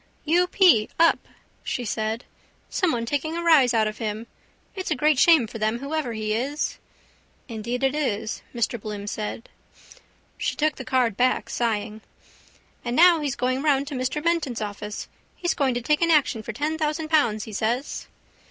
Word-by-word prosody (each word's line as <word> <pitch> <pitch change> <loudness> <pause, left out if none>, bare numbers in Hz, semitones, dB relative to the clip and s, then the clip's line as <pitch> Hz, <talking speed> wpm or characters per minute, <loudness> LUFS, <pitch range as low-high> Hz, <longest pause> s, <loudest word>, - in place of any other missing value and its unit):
—U. 350 +3 +3
p: 355 - +4
up, 335 0 +4 0.4
she 245 - -3
said. 220 +2 -2 0.5
Someone 315 - 0
taking 295 +6 -2
a 340 - -3
rise 300 -7 +5
out 220 -2 +2
of 215 0 -6
him. 220 0 -3 0.5
It's 375 -2 -5
a - - +1
great 295 +1 +2
shame 320 -7 +6
for 225 +1 -8
them 215 +2 0
whoever 280 -1 -3
he 215 -1 -2
is. 275 +7 -2 0.7
—Indeed 235 +2 -4
it 270 0 +2
is, 225 -8 -2
Mr 235 -1 -2
Bloom 205 -1 -6
said. 210 +2 -5 0.9
She - - -1
took 305 0 +1
back - - -29
the 260 - -7 0.3
card, 255 +1 +2
sighing. 215 -2 -2 0.8
—And 240 0 -2
now 345 +1 +7
he's 285 -4 -2
going 255 +1 0
round 280 -2 +2
to - - -6
Mr 260 +3 -2
Menton's 330 -8 0
office. 210 0 -5 0.3
He's 350 - -1
going 265 -3 0
to 245 - -1
take 300 +6 +1
an 335 - +3
action 290 -7 +3
for 225 - -6
ten 300 +7 -2
thousand 310 0 -1
pounds, 230 -10 +2
he 220 - -9
says. 235 +7 -2
255 Hz, 175 wpm, -24 LUFS, 220-305 Hz, 0.9 s, now